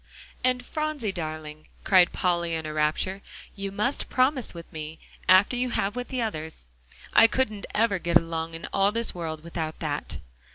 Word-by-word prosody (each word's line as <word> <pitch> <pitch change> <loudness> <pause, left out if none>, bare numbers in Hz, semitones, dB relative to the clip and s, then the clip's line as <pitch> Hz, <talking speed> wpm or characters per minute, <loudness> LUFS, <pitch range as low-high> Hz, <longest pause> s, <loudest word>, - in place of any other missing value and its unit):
"And, 250 0 +1
Phronsie 305 -9 -2
darling," 155 -3 -6 0.2
cried 185 -3 +5
Polly 170 -2 0
in 160 -1 -3
a 155 - -4
rapture, 155 +6 0 0.3
"you 195 0 -4
must 210 +7 -1
promise 255 -1 +2
with 170 +1 -11
me, 155 0 -5 0.3
after 190 +6 +6
you 250 +1 0
have 205 -2 0
with 250 0 -4
the 255 -3 -1
others. 160 - -2 0.5
I 225 - +9
couldn't 215 -4 -1
ever 210 -3 +3
get 170 -1 +4
along 165 0 -3
in 165 - -7
all 195 +1 +4
this 230 +1 0
world 160 -3 -5
without 165 -2 -4
that." 150 -2 -3
185 Hz, 170 wpm, -26 LUFS, 160-230 Hz, 0.5 s, I